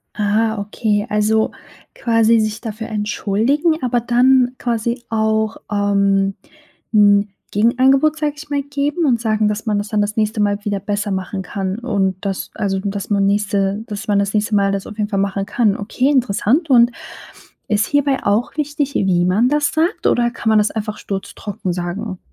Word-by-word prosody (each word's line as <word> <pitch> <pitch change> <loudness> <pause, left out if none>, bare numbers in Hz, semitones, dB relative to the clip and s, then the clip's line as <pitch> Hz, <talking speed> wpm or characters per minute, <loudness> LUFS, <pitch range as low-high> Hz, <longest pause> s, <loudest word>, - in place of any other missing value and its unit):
Ah, 220 +1 +1
okay. 210 +1 -1
Also, 215 +1 +1 0.4
quasi 230 -1 +3
sich 215 +1 -2
dafür 225 -1 -6
entschuldigen, 230 - 0
aber 245 -1 +1
dann 250 +1 +3
quasi 235 +1 -2
auch, 220 -1 0
ähm, 200 -1 +1 0.6
'n 205 -1 +5 0.2
Gegenangebot, 265 +8 +3
sage 300 -1 0
ich 300 0 -11
mal, 285 -1 0
geben 285 +4 -1
und 240 -4 +2
sagen, 215 -2 +1
dass 210 +1 -2
man 210 -2 0
das 205 - -4
dann 215 -2 +1
das 205 +1 -2
nächste 215 0 0
Mal 205 0 0
wieder 205 -1 -1
besser 205 +1 -2
machen 190 +1 -3
kann 190 +1 -3
und 200 -6 0
das 195 -1 -3
also, 195 -3 -1
dass 200 +1 -4
man 200 -1 +2
nächste 200 0 0
dass 210 0 -6
man 205 -1 +2
das 200 0 -1
nächste 210 +1 +1
mal 200 -1 +3
das 195 -1 -3
auf 210 - -10
jeden 210 0 -1
Fall 195 - -1
machen 195 0 -1
kann. 210 -2 +1
Okay, 250 +6 0
interessant, 260 - +1
und 240 -2 +6 0.8
ist 210 0 +1
hierbei 285 -2 +1
auch 210 +8 0
wichtig, 290 -1 -2
wie 180 -3 +2
man 210 +8 +3
das 295 0 +1
sagt, 330 +6 0
oder 240 -1 +2
kann 225 -1 -2
man 220 - +4
das 210 - +2
einfach 215 -1 -4
sturztrocken 195 -1 -5
sagen? 185 +3 -4
215 Hz, 175 wpm, -18 LUFS, 200-240 Hz, 0.8 s, und